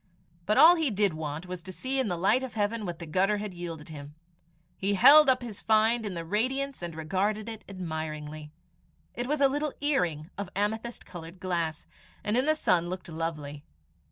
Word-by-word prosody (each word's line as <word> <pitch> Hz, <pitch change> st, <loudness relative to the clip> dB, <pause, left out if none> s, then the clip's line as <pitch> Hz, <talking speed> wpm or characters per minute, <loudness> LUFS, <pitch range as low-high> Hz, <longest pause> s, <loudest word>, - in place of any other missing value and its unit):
But 215 Hz, -, +2 dB
all 345 Hz, +3 st, +8 dB
he 320 Hz, -4 st, +1 dB
did 205 Hz, -4 st, +1 dB
want 155 Hz, +1 st, -5 dB
was 180 Hz, -1 st, -6 dB
to 185 Hz, +3 st, -9 dB
see 260 Hz, +8 st, -2 dB
in 260 Hz, -, +1 dB
the 175 Hz, -3 st, -2 dB
light 195 Hz, +9 st, +3 dB
of 260 Hz, -3 st, -6 dB
heaven 210 Hz, 0 st, -1 dB
what 175 Hz, -1 st, -4 dB
the 170 Hz, -, -8 dB
gutter 190 Hz, +6 st, +1 dB
had 205 Hz, -2 st, -5 dB
yielded 170 Hz, -3 st, -7 dB
him. 145 Hz, -1 st, -9 dB, 0.6 s
He 200 Hz, +1 st, 0 dB
held 295 Hz, +9 st, +8 dB
up 255 Hz, -1 st, +3 dB
his 220 Hz, -4 st, -7 dB
find 220 Hz, +1 st, +3 dB
in 190 Hz, -, -5 dB
the 165 Hz, -1 st, -5 dB
radiance 260 Hz, +8 st, -1 dB
and 170 Hz, -2 st, -5 dB
regarded 195 Hz, +7 st, -1 dB
it 225 Hz, -1 st, -7 dB
admiringly. 155 Hz, -4 st, -6 dB, 0.6 s
It 245 Hz, +1 st, -3 dB
was 295 Hz, +1 st, -1 dB
a 275 Hz, -, +7 dB
little 290 Hz, +1 st, -2 dB
earring 180 Hz, -, 0 dB
of 200 Hz, -2 st, -4 dB
amethyst 220 Hz, +4 st, -2 dB
coloured 170 Hz, 0 st, -10 dB
glass, 170 Hz, -4 st, -2 dB, 0.4 s
and 210 Hz, -, 0 dB
in 255 Hz, +4 st, +3 dB
the 310 Hz, -, +4 dB
sun 175 Hz, -, +1 dB
looked 180 Hz, -1 st, -6 dB
lovely. 150 Hz, -3 st, -5 dB
195 Hz, 195 wpm, -28 LUFS, 165-230 Hz, 0.6 s, all